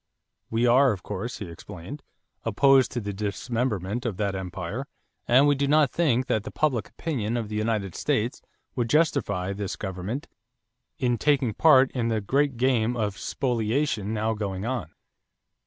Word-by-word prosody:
"We 115 +2 +1
are, 130 +2 +5
of 95 -4 -5
course," 105 +4 -4
he 105 - -6
explained, 90 - -9 0.4
"opposed 130 +3 +4
to 120 - -1
the 100 -2 -4
dismemberment 105 +1 -2
of 115 -7 -3
that 100 -2 0
empire 95 +7 -5 0.4
and 130 +4 +6
we 145 - +5
do 140 0 0
not 150 -1 +4
think 130 -7 +2
that 110 - 0
the - - -7
public 135 -8 0
opinion 120 -8 -2
of 110 -3 -3
the 105 - -4
United 105 -4 -1
States - - -1 0.3
would 120 -2 -1
justify 105 - +1
this 100 -1 -4
government 100 - -5 0.7
in 120 -3 0
taking 135 -6 +2
part 135 -3 +5
in 120 -3 -1
the 110 -1 +1
great 135 +5 +1
game 120 -1 +2
of 105 -3 -1
spoliation 120 -2 -1
now 110 0 0
going 100 -2 -4
on." 120 -9 -2
115 Hz, 160 wpm, -26 LUFS, 105-130 Hz, 0.7 s, and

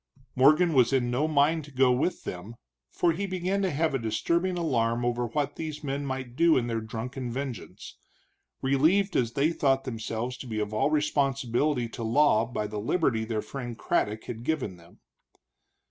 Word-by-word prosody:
Morgan 155 +6 +5
was 125 -3 +4
in 125 -3 +1
no 140 +6 +1
mind 155 +1 +2
to - - -13
go 130 -1 +4
with 150 +8 0
them, 95 +6 -7 0.3
for 175 - +1
he 200 +5 -3
began 185 +1 -1
to 190 - +1
have 160 0 0
a 135 - 0
disturbing 170 +11 0
alarm 120 -7 0
over 120 0 0
what 145 +3 -2
these 155 -2 -5
men 140 0 -3
might 130 -2 -5
do 165 +2 +4
in 120 - +1
their 115 -1 -2
drunken 120 +3 -5
vengeance, 130 -4 -6 0.7
relieved 160 +10 +3
as 115 -2 +1
they 145 +3 +2
thought 135 -4 +1
themselves 115 0 -4
to 130 - -9
be 110 -2 -3
of 105 0 -3
all 110 +6 +2
responsibility 140 -3 +1
to 115 - -8
law 115 -1 +3
by 115 -3 -3
the 105 0 -4
liberty 115 - 0
their 110 -2 -2
friend 120 0 -6
Craddock 105 -1 -1
had 115 -1 -7
given 130 - -2
them. 85 0 -20
130 Hz, 180 wpm, -27 LUFS, 115-150 Hz, 0.7 s, Morgan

